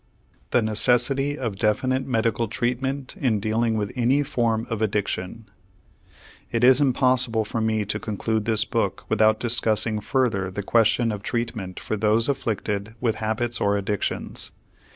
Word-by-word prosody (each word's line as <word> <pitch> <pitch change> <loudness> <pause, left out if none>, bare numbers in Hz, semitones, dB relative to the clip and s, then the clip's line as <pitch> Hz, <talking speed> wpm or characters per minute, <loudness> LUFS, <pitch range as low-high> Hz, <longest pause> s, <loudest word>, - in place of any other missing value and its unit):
THE 120 - +2
NECESSITY 125 +6 +2
OF 115 -8 -3
DEFINITE 130 +6 0
MEDICAL 115 -2 0
TREATMENT 130 - -2
IN 125 - +1
DEALING 110 +2 0
WITH 105 -1 -2
ANY 130 +4 +2
FORM 115 -5 0
OF 110 -1 -2
ADDICTION 105 0 -2 1.1
It 115 0 0
is 130 +2 +6
impossible 125 -4 +2
for 110 +2 -3
me 110 -1 0
to 105 +1 -2
conclude 110 0 -2
this 110 -1 +2
book - - -2
without 110 0 +3
discussing 110 -2 +1
further 110 -5 0
the 100 +2 -5
question 115 +2 +3
of 105 -2 -5
treatment 115 -7 -3
for 110 - -3
those 110 +2 +2
afflicted 110 -5 -2
with 115 -2 0
habits 110 +2 -2
or 100 0 +2
addictions. 100 0 -2
115 Hz, 145 wpm, -24 LUFS, 105-125 Hz, 1.1 s, is